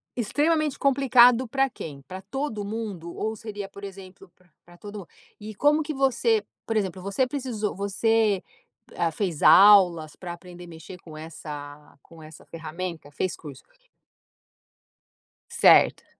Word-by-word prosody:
Extremamente 295 +5 0
complicado 255 -2 +4
pra 270 +3 +1
quem? 145 - -9
Para 185 +8 -10
todo 215 0 -4
mundo 200 -6 -6
ou 220 - -3
seria, 205 -3 -7
por 200 +1 -13
exemplo, 195 -1 -11
para 180 -1 -29 0.2
para 175 0 -18
todo 205 +2 -9
mundo? 180 - -12 0.3
E 215 0 -9
como 295 +6 +3
que 305 0 -4
você 245 -5 +1 0.2
por 225 - -3
exemplo, 190 -3 -2
você 200 +7 0
precisou 250 -6 -3
você, 205 +1 +1 0.5
ah, 170 -1 0
fez 170 -2 -3
aulas 180 -6 +6
pra 175 -2 -7
aprender 175 0 -12
mexer 165 +2 -11
com 155 -2 -12
essa 150 -2 -10
com 165 - -18
com 160 - -13
essa 155 0 -14
ferramenta? 165 0 -7
Fez 185 +5 -3
curso. 145 -4 -11 1.9
Certo. - - +4
195 Hz, 145 wpm, -25 LUFS, 170-230 Hz, 1.9 s, aulas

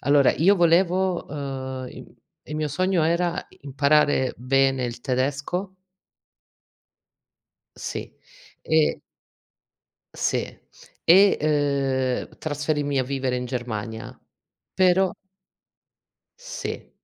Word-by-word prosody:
allora 140 0 +4
io 195 +6 +4
volevo, 175 +1 +2
uhm, 130 -3 -5
im - - -12 0.3
i 150 - -7
mio 155 0 -1
sogno 180 +3 +1
era: 170 +1 0 0.2
imparare 140 -1 +2
bene 135 0 +2
il 120 0 -5
tedesco 145 +9 -2 2.0
sì, - - -6 0.5
e 160 -1 +2 1.1
sì, - - 0 0.6
e, 195 +4 +6 0.9
uhm, - - -21
trasferirmi 145 -2 -1
a 130 - +1
vivere 130 -1 -2
in 125 - -3
Germania. 115 -3 -5 0.6
Però 185 0 +4 1.3
Sì. - - -6
145 Hz, 90 wpm, -24 LUFS, 130-175 Hz, 2.0 s, e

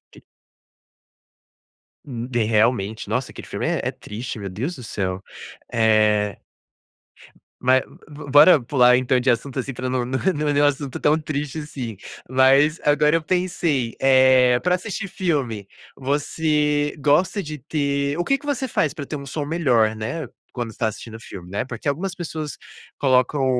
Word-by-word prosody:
que - - -16 1.8
Hum, 120 -3 -5
de 120 -3 0
realmente, 110 -1 +1
nossa, 120 +5 -2
aquele - - -10
filme - - -3
é - - 0
é - - -1
triste, 115 +1 -7
meu 100 - -5
Deus 125 - -4
do 125 - -10
céu. 95 -4 -3 0.5
Eh 110 -3 +2 1.3
Ma 130 +1 +5 0.3
bora 145 +2 +5
pular 125 0 +4
então 130 0 +2
de 130 +1 0
assunto, 130 +3 0
assim, 135 - -3
pra 130 0 -5
não 125 -1 0
não 130 +2 -2 0.2
não 150 0 -2
é 145 0 +3
um - - +6
assunto 140 -2 -1
tão 150 +1 +3
triste, 150 0 -4
assim. 130 -7 -6 0.3
Mas 135 +4 +4
agora 150 +2 +3
eu 165 - +1
pensei, 160 -8 -1
eh, 130 -2 +5
para 180 +1 +1
assistir 195 +1 -5
filme, 135 - -2 0.3
você 150 +1 0
gosta 165 +7 +2
de 150 -1 -7
ter 140 0 -1
o 175 - 0
quê 275 +6 +1
que - - -15
você 270 -2 -1
faz 155 - 0
para 145 - -6
ter 150 - -5
um 140 -1 -7
som 145 +2 -3
melhor, 125 -9 +2
né, 115 +10 -4 0.2
quando 120 -2 -4
está 110 0 -1
assistindo 110 +1 -7
o - - -15
filme, 90 -4 -10
né? 100 - -1
Porque 120 +2 -7
algumas 175 +6 -2
pessoas 155 -3 -5 0.4
colocam 130 +1 +2
135 Hz, 165 wpm, -22 LUFS, 120-150 Hz, 1.8 s, um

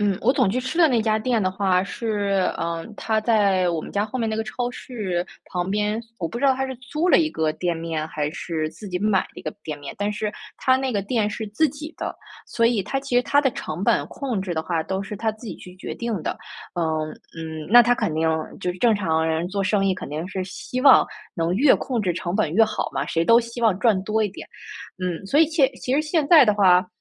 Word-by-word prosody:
嗯， 200 -2 +1
我 255 +4 +3
总 210 - +2
去 250 +6 0
吃 260 +7 -4
的 335 - +7
那 240 -5 +2
家 215 -1 +2
店 230 -1 0
的 185 - +1
话 190 -1 +1
是， 200 -2 -1
呃， 165 0 -3
它 220 -1 0
在 200 -5 +3
我 165 -2 -1
们 - - -9
家 205 +1 0
后 240 - -5
面 225 -3 -1
那 220 - -2
个 220 - -1
超 245 +2 -3
市 195 -9 -4 0.2
旁 180 0 -3
边， 210 +2 0 0.2
我 165 - -1
不 235 - -5
知 280 - -1
道 265 -1 +5
它 265 - -1
是 265 -1 -5
租 300 +8 -2
了 - - +6
一 320 - +2
个 160 -1 0
店 175 -2 -1
面 160 -1 -3
还 150 -1 -3
是 155 -2 -3
自 210 - -11
己 180 - -2
买 200 -1 +2
了 - - -11
一 - - -10
个 155 - -3
店 155 -2 -4
面， 140 - -7
但 205 +1 -1
是 210 0 -3 0.2
它 260 0 +3
那 260 -1 -2
个 200 - 0
店 215 0 0
是 220 +1 -4
自 300 +9 +2
己 305 +2 -8
的， - - -4 0.3
所 230 - 0
以 230 -3 +3
它 240 +8 -2
其 270 -3 -1
实 250 - +4
它 285 - +3
的 270 -2 +2
成 165 -5 -5
本 - - +2
控 255 -8 -3
制 185 -3 -3
的 160 - -1
话 160 -1 -1
都 190 0 -2
是 205 +1 -6
它 220 +1 -1
自 220 +1 -10
己 - - -6
去 180 0 -12
决 185 - -7
定 230 -7 -3
的。 - - -3 0.4
呃， 170 - +1 0.5
嗯， 160 -1 -6
那 240 +3 +9
它 240 +1 +3
肯 165 -9 -1
定 160 +1 +1 0.3
就 180 - -1
是 185 - -12
正 230 0 +4
常 160 -5 0
人 160 +2 -1
做 195 0 -2
生 195 0 +2
意， 190 - +3
肯 - - -7
定 155 +4 -4
是 185 -1 -3
希 250 +6 -5
望 270 -1 +7 0.3
能 165 0 0
越 275 +4 +6
控 250 -4 -2
制 185 -4 0
成 175 +2 -3
本 215 - 0
越 225 - +6
好 215 -1 0
嘛， - - -1
谁 165 0 0
都 230 +4 +6
希 235 0 -7
望 215 -5 +4
赚 220 -6 +3
多 215 +1 +1
一 210 - +1
点。 190 - -10 0.6
嗯， 180 +1 -3
所 285 +10 +3
以 320 - +6
现 305 -5 +3
其 250 +1 -4
实 285 - +3
现 310 0 0
在 315 -6 +9
的 210 -2 +3
话 185 -2 +5
210 Hz, 280 characters per minute, -23 LUFS, 180-240 Hz, 0.6 s, 那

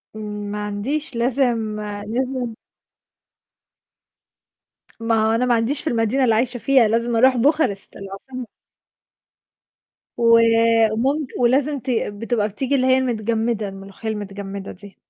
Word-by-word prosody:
ما 210 -1 -5
عنديش، 265 +9 -3
لازم 235 -3 0 0.3
لازم 250 0 -2 2.5
ما 225 -1 +1
هو 220 - +2
أنا 235 +3 +1
ما 245 - +2
عنديش 235 +5 0
في 320 - -7
المدينة 235 +3 +1
اللي 225 -3 +3
عايشة 245 +2 0
فيها، 255 -2 +4
لازم 230 +1 0
أرُوح 255 +2 +5
بوخارست 260 -6 +1
العاصمة. 215 +6 -8 1.7
و 230 -1 +5 0.6
ممك 275 +4 0
ولازم 270 +4 +2
ت 255 - -7
بتبقى 225 -1 -1
بتيجي 255 +7 -2
اللي 260 -1 +2
هي 260 - +5
المتجمدة، 225 -3 -1
الملوخية 195 +3 -8
المتجمدة 200 -2 -6
دي. 200 +1 -14
230 Hz, 120 wpm, -21 LUFS, 210-255 Hz, 2.5 s, أرُوح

